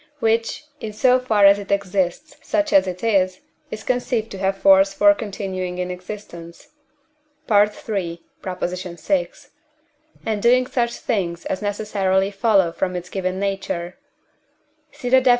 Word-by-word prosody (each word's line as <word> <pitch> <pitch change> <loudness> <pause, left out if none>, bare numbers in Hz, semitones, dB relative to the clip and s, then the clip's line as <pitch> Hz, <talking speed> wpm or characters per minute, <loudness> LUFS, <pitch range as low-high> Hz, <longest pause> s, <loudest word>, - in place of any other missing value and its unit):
which, 230 +5 0
in 220 - -5
so 250 +4 +3
far 220 -5 +3
as 200 0 +7
it 200 - -9
exists 200 - -1
such 310 0 0
as 190 -1 +5
it 180 +2 -5
is, 185 -4 +2 0.3
is 215 - -7
conceived 245 -3 -1
to 195 - -7
have 195 0 0
force 195 0 +5
for 305 0 +6
continuing 190 -7 -4
in 180 0 -3
existence 180 -2 -9 0.8
(III. 205 -1 +5
vi.) 195 -5 -4 2.1
and 215 -2 -1
doing 250 +3 +4
such 235 -2 -1
things 175 -6 -2
as 185 - -3
necessarily 200 -2 0
follow 195 -3 +3
from 185 +1 -2
its 175 0 -5
given 185 -1 -2
nature 195 -3 -3 1.0
(see 245 - -7
the 260 +1 +6
Def. 255 - +3
200 Hz, 140 wpm, -21 LUFS, 185-225 Hz, 2.1 s, as